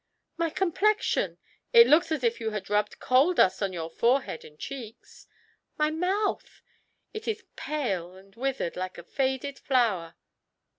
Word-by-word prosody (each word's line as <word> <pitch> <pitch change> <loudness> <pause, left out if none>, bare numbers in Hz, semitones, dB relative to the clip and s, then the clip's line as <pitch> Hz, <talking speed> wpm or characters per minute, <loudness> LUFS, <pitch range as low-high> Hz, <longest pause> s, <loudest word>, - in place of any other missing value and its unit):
"My 335 -1 0
complexion 385 +5 +1 0.2
" - - -42
"It 470 -1 +10
looks 325 -1 +4
as 305 -5 -1
if 235 -1 +1
you 225 -1 -2
had 210 -2 -6
rubbed 210 0 +1
coal 275 +8 +3
dust 190 - +3
on 195 -2 0
your 165 -2 -5
forehead 240 -1 +1
and 150 - -15
cheeks." 245 - -9 0.5
"My 305 0 +2
mouth 370 +6 -2 0.2
" - - -48
"It 435 0 -7
is 450 0 -2
pale 190 - -3
and 195 +1 -17
withered, 260 -7 -2
like 185 0 -5
a 170 - -9
faded 265 +5 -2
flower." 205 -11 +1
255 Hz, 160 wpm, -27 LUFS, 195-320 Hz, 0.5 s, It